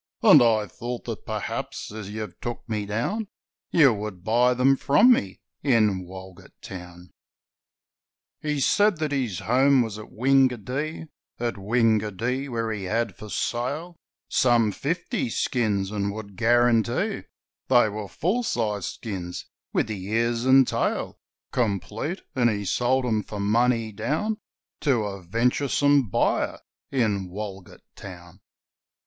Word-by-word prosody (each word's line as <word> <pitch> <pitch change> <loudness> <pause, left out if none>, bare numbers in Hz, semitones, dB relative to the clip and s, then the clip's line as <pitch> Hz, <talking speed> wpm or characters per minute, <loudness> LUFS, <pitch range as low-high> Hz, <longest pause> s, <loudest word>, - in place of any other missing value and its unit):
'And - - +8
I 110 -3 +3
thought 120 +4 -6
that - - -6
perhaps, - - -4
as 105 -2 -7
you've 110 0 -7
took 120 -1 -5
me 105 -2 -3
down, 180 - -2 0.4
You 140 -7 +5
would 105 -4 -6
buy 120 +4 +3
them 130 +2 +4
from 190 - +5
me, 95 - -3 0.2
in 110 -8 +2
Walgett 95 0 -12
Town!' 90 -1 -10 1.3
He 150 -1 -1
said 205 +5 +3
that 155 -1 -2
his 125 -10 -1
home 130 +2 +4
was 110 -2 -6
at 105 - -10
Wingadee, 135 +4 +1 0.3
At 120 0 -1
Wingadee 115 +4 0
where 115 -2 -2
he 100 -3 -4
had 110 0 -1
for 105 - -10
sale 145 - -2 0.3
Some 120 -4 +3
fifty 165 - -2
skins 105 -5 0
and 100 -1 -1
would 100 -2 -8
guarantee 120 -1 +2 0.5
They 120 -3 +5
were 105 -1 -5
full 185 - -1
sized 105 - -1
skins, 90 -6 -6 0.3
with - - +1
the 105 -4 -5
ears 115 +3 0
and 130 -1 +6
tail - - -1 0.3
Complete, 115 - -2
and 120 -2 +3
he 105 -2 -2
sold 125 +6 +1
them 110 -3 +1
for 105 0 -7
money 115 +2 +2
down 155 - -2 0.4
To 130 -7 +2
a 100 -2 -5
venturesome 125 +6 +2
buyer - - +1 0.3
in 105 -8 0
Walgett 95 -1 -8
Town. 90 -3 -11
115 Hz, 135 wpm, -25 LUFS, 105-130 Hz, 1.3 s, And